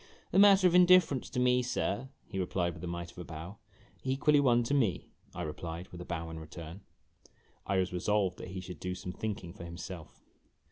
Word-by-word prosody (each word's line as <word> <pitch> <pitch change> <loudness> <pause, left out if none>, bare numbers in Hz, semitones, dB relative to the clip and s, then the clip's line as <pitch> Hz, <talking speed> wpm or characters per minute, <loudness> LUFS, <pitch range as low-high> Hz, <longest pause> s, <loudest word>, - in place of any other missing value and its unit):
"A 190 - +5
matter 200 -1 +7
of 180 - +5
indifference 180 -6 +5
to - - -2
me, 125 0 +4
sir," 125 0 -2 0.2
he 95 -3 -5
replied 90 -1 -1
with 80 +1 -11
a - - -3
mite 85 0 -5
of - - -13
a - - -5
bow. 85 +5 -8 0.2
" - - -29
Equally 150 +2 +4
one 120 -4 +4
to 115 - -1
me," 115 - +1 0.2
I 90 - -3
replied, 85 +3 -6
with 90 - -9
a - - -7
bow 80 -1 -4
in 80 - -6
return. 80 +3 -9 0.9
I 95 - +1
was 95 -1 0
resolved 95 0 0
that - - -7
he 95 +1 -6
should 90 -3 -9
do 90 +2 -3
some 90 0 -6
thinking 100 -6 -4
for 95 - -10
himself. 85 0 -9
95 Hz, 215 wpm, -31 LUFS, 85-125 Hz, 0.9 s, matter